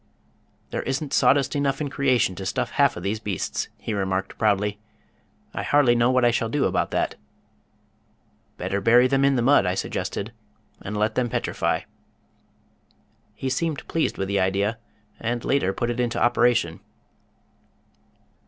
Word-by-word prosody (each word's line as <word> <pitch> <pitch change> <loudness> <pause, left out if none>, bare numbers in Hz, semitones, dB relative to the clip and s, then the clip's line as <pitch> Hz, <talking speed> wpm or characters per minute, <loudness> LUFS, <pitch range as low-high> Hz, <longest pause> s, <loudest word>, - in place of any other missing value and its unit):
"There - - -2
isn't 135 +2 -3
sawdust 140 +1 +3
enough 140 -1 0
in 145 -3 -3
creation 130 -9 +2
to 95 +1 -7
stuff - - -2
half - - +2
of - - -7
these 105 +3 -1
beasts," 100 -5 -3
he 110 - -5
remarked 95 -1 -2
proudly. 105 -1 +1 0.7
"I - - -3
hardly 145 -4 +4
know 120 0 +3
what 130 -1 +3
I 120 - +5
shall 115 -1 -1
do 145 +3 +1
about - - 0
that." - - -1 1.4
"Better 100 0 -2
bury 120 +4 +5
them 135 +1 +2
in 140 0 +4
the 120 - +1
mud," 135 -6 +4
I 90 - 0
suggested, 100 +3 -3 0.5
"and 105 +2 -5
let 105 +1 +1
them 125 -1 0
petrify." - - -1 1.5
He 135 - -4
seemed 150 +3 -2
pleased 165 - -1
with 95 - -2
the 100 0 0
idea, 100 +4 0 0.4
and 120 +1 -3
later 135 -9 +1
put 120 +5 -2
it 120 - -4
into 120 -1 0
operation. 120 -8 +2
120 Hz, 155 wpm, -24 LUFS, 100-135 Hz, 1.5 s, I